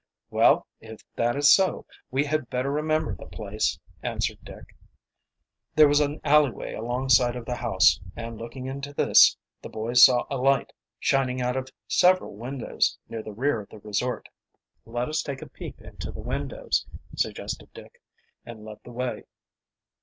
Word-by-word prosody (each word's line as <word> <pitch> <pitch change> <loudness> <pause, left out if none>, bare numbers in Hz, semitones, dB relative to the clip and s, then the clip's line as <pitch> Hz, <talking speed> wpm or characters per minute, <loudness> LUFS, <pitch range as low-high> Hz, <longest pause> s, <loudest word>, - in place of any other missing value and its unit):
"Well, - - +4
if 110 -1 -12
that 120 0 +1
is 145 0 +5
so 190 -1 +2 0.2
we 135 +3 +1
had 155 -3 -1
better 130 +2 -1
remember 155 -3 0
the 85 - -9
place," - - -2 0.2
answered - - -2
Dick. - - -13 1.0
There 155 -1 +8
was 145 0 +4
an 145 0 0
alleyway 145 -3 +2
alongside 120 +1 +2
of 120 -2 -6
the 125 - -3
house, 115 -6 +3 0.2
and 115 0 -6
looking 125 +3 -7
into 140 +2 -6
this - - +6 0.2
the - - -8
boys 115 +3 +3
saw 125 -2 +7
a 135 - -1
light 135 +2 +1 0.2
shining 130 -1 +1
out 125 0 -1
of 130 0 -3 0.2
several 185 +1 +3
windows 125 +4 -1
near 115 - -5
the 110 - -8
rear 120 +2 0
of 100 - -14
the - - -12
resort. 105 +4 -3 0.6
"Let 120 +2 -2
us 155 0 -1
take 140 -2 -6
a - - -10
peep - - -9
into - - -8
the - - -10
windows," - - -2 0.3
suggested - - -3
Dick, 485 - -14 0.4
and 110 -2 -10
led 105 -1 -10
the 125 - -11
way. 125 +1 -4
125 Hz, 165 wpm, -26 LUFS, 115-145 Hz, 1.0 s, There